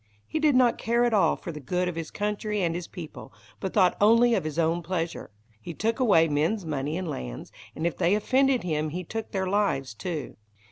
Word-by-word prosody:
He 315 Hz, -, -3 dB
did 300 Hz, -3 st, +3 dB
not 250 Hz, -2 st, +4 dB
care 235 Hz, +1 st, +1 dB
at 240 Hz, -, +1 dB
all 190 Hz, -7 st, +4 dB
for 170 Hz, -, -7 dB
the 150 Hz, -, -8 dB
good 180 Hz, +6 st, -1 dB
of 180 Hz, -, -3 dB
his 165 Hz, -1 st, -5 dB
country 210 Hz, -1 st, -2 dB
and 165 Hz, -1 st, +1 dB
his 175 Hz, 0 st, -5 dB
people, 150 Hz, -, -9 dB, 0.3 s
but 190 Hz, -, -3 dB
thought 185 Hz, -4 st, +4 dB
only 230 Hz, +3 st, +5 dB
of 190 Hz, -, 0 dB
his 155 Hz, 0 st, -4 dB
own 165 Hz, +1 st, +1 dB
pleasure. 170 Hz, -1 st, -3 dB, 0.3 s
He 165 Hz, +9 st, -7 dB
took 225 Hz, -, -1 dB
away 195 Hz, -10 st, +5 dB
men's 165 Hz, +7 st, 0 dB
money 150 Hz, 0 st, -2 dB
and 185 Hz, -1 st, -4 dB
lands, 60 Hz, -, -6 dB, 0.2 s
and 160 Hz, -, -3 dB
if 170 Hz, -, -1 dB
they 180 Hz, +2 st, +3 dB
offended 260 Hz, +4 st, +2 dB
him 155 Hz, -3 st, -1 dB
he 180 Hz, +4 st, -4 dB
took 225 Hz, +5 st, -5 dB
their 190 Hz, -1 st, -1 dB
lives 185 Hz, -, 0 dB
too. 155 Hz, -, -5 dB
180 Hz, 220 wpm, -26 LUFS, 160-215 Hz, 0.3 s, only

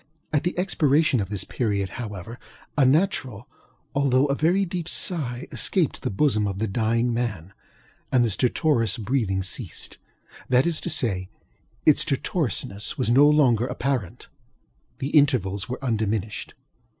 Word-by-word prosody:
At 150 Hz, -, +2 dB
the 175 Hz, 0 st, -2 dB
expiration 160 Hz, -, +2 dB
of 95 Hz, -2 st, -3 dB
this 100 Hz, -3 st, -2 dB
period, 100 Hz, -5 st, -2 dB
however, 105 Hz, +1 st, -7 dB, 0.4 s
a 135 Hz, -4 st, +4 dB
natural 130 Hz, -, 0 dB, 0.5 s
although 140 Hz, -1 st, +3 dB
a 140 Hz, -, 0 dB
very 175 Hz, +7 st, +2 dB
deep 175 Hz, -2 st, -3 dB
sigh 135 Hz, -9 st, 0 dB
escaped 180 Hz, -7 st, 0 dB
the -, -, -2 dB
bosom 105 Hz, -1 st, +1 dB
of 100 Hz, -1 st, -4 dB
the 110 Hz, -, -1 dB
dying 115 Hz, +3 st, 0 dB
man, 105 Hz, -7 st, -3 dB, 0.6 s
and 125 Hz, -2 st, +4 dB
the 115 Hz, -, 0 dB
stertorous 120 Hz, -, +1 dB
breathing 110 Hz, -4 st, -1 dB
ceasedŌĆöthat 125 Hz, +6 st, -3 dB
is 170 Hz, -2 st, 0 dB
to -, -, -4 dB
say, 105 Hz, -12 st, 0 dB, 0.6 s
its -, -, +5 dB
stertorousness 100 Hz, +8 st, -1 dB
was 125 Hz, -4 st, 0 dB
no 140 Hz, +4 st, +6 dB
longer 125 Hz, -6 st, +3 dB
apparent; 125 Hz, -10 st, -3 dB, 0.7 s
the 135 Hz, -, -3 dB
intervals 120 Hz, -, +2 dB
were 125 Hz, -, -3 dB
undiminished. 110 Hz, -3 st, -2 dB
125 Hz, 140 wpm, -24 LUFS, 105-145 Hz, 0.7 s, no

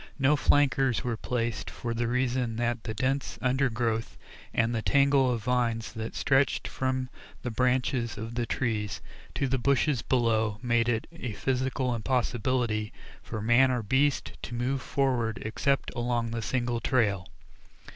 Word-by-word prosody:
No 140 Hz, +1 st, +4 dB
flankers 135 Hz, -3 st, +3 dB
were 120 Hz, -2 st, -1 dB
placed 115 Hz, 0 st, -2 dB
for 120 Hz, -1 st, -4 dB
the 115 Hz, 0 st, -1 dB
reason 125 Hz, -1 st, 0 dB
that 120 Hz, 0 st, -1 dB
the 110 Hz, -, -3 dB
dense 135 Hz, +5 st, -1 dB
undergrowth 120 Hz, -4 st, 0 dB, 0.3 s
and 115 Hz, +1 st, +1 dB
the 115 Hz, -, -1 dB
tangle 140 Hz, 0 st, +4 dB
of 115 Hz, -3 st, -2 dB
vines 120 Hz, -2 st, 0 dB
that 110 Hz, 0 st, -5 dB
stretched 135 Hz, +1 st, +2 dB
from 130 Hz, -1 st, -1 dB, 0.4 s
the 125 Hz, -, -2 dB
branches 125 Hz, 0 st, 0 dB
of 115 Hz, +2 st, -5 dB
the 120 Hz, -1 st, -2 dB
trees 110 Hz, -4 st, -1 dB, 0.4 s
to 140 Hz, -, 0 dB
the 130 Hz, 0 st, 0 dB
bushes 140 Hz, 0 st, +2 dB
below 110 Hz, -4 st, +1 dB
made 120 Hz, -1 st, +2 dB
it 115 Hz, -2 st, 0 dB
a 130 Hz, -9 st, -5 dB
physical 130 Hz, +2 st, -1 dB
impossibility 120 Hz, -2 st, 0 dB, 0.3 s
for 110 Hz, -1 st, -5 dB
man 120 Hz, +4 st, +5 dB
or 125 Hz, -2 st, 0 dB
beast 135 Hz, +6 st, +1 dB
to 120 Hz, -, -5 dB
move 130 Hz, +3 st, -1 dB
forward 120 Hz, -5 st, 0 dB
except 140 Hz, +5 st, 0 dB
along 120 Hz, -1 st, -1 dB
the 115 Hz, 0 st, -2 dB
single 120 Hz, 0 st, -1 dB
trail. 110 Hz, -7 st, +1 dB
120 Hz, 150 wpm, -28 LUFS, 115-130 Hz, 0.4 s, man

